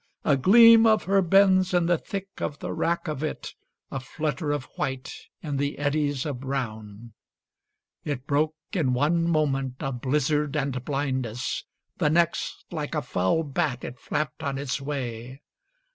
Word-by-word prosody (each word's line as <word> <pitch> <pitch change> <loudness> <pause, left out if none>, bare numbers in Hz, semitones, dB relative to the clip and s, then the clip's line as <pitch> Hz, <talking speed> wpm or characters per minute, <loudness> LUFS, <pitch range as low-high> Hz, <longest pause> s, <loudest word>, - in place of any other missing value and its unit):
A 145 - +4
gleam 225 - +7
of 220 -1 +4
her 195 +1 +3
bends 185 0 +4
in 175 -1 +3
the 170 -1 +2
thick 195 -1 -5
of 145 - -3
the - - -5
wrack 170 +1 -1
of 150 -3 -3
it, 155 - -4 0.4
A 135 - -3
flutter 150 +3 -3
of 145 -3 -1
white 130 -1 -3 0.3
in 145 -3 -2
the 140 +1 -1
eddies 145 -2 0
of 140 -5 -3
brown. 115 -5 -5 0.9
It 140 -4 -4
broke 150 +2 +1 0.2
in 150 -9 +1
one 165 +5 +2
moment 135 -5 0
of 130 -3 -3
blizzard 150 +2 0
and 135 -3 -2
blindness; 130 -4 -2 0.3
The 150 - +3
next, 170 +2 0
like - - -4
a - - -1
foul 95 - +1
bat, 145 -3 -2
it 125 +1 -7
flapped 150 -4 -3
on 140 -2 -2
its 140 0 -3
way. 130 -3 -5
145 Hz, 160 wpm, -26 LUFS, 130-160 Hz, 0.9 s, gleam